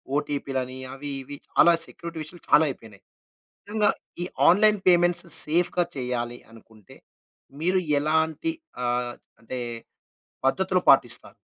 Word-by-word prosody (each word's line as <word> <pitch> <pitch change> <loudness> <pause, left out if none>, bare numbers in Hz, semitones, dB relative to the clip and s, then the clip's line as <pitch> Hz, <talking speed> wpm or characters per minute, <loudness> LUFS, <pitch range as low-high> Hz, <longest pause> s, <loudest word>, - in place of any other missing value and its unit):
OTP 145 -1 -3
లని, 130 0 -4
అవి, 145 +1 -7
ఇవి 145 +2 -9
చాలా 170 - +5
సెక్యూరిటీ 170 -1 -9
విషయాలు 170 +3 -11
చాలా 155 - +6
అయిపోయినాయి. 110 -6 -11 0.6
నిజంగా, 210 0 +2 0.3
ఈ - - -1 0.2
ఆన్‌లైన్ 210 +4 +5
పేమెంట్స్ 175 0 +4 0.2
సేఫ్‌గా 175 +3 +1
చేయాలి 120 -2 -3
అనుకుంటే, 110 -3 -18 0.7
మీరు 185 +2 +2 0.2
ఎలాంటి 160 - 0 0.3
ఆహ్, 120 0 -1 0.3
అంటే 125 +3 -6 0.9
పద్ధతులు - - +1
పాటిస్తారు? - - +4
150 Hz, 115 wpm, -25 LUFS, 125-175 Hz, 0.9 s, చాలా